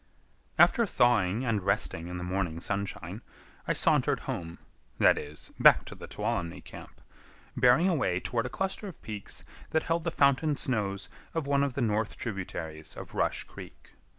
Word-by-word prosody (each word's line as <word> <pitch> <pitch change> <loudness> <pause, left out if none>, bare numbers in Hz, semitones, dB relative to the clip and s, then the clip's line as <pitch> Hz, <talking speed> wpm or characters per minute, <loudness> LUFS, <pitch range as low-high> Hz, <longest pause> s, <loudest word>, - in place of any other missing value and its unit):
After 235 - +6
thawing 120 - +2
and 110 -4 +1
resting 95 -3 0
in 90 0 -5
the 90 - -5
morning 90 -3 -2
sunshine, 100 +1 -3 0.5
I - - +2
sauntered - - +2
home,—that 80 -7 -1
is, 75 +1 -8
back - - +7
to - - -8
the - - -10
Tuolumne 85 -1 -2
camp,—bearing 125 +8 -1
away 130 - +1
toward 115 +4 -1
a - - -7
cluster 195 +2 -2
of 185 - -9
peaks 105 -2 -6 0.2
that 160 0 +1
hold 165 0 0
the 170 - 0
fountain 145 0 +3
snows 105 -7 -1 0.3
of 165 -3 -1
one 140 0 +2
of 140 -3 -1
the 140 - -1
north 110 -1 0
tributaries 80 -7 -5
of - - -9
Rush - - 0
Creek. - - -13
105 Hz, 155 wpm, -29 LUFS, 90-140 Hz, 0.5 s, back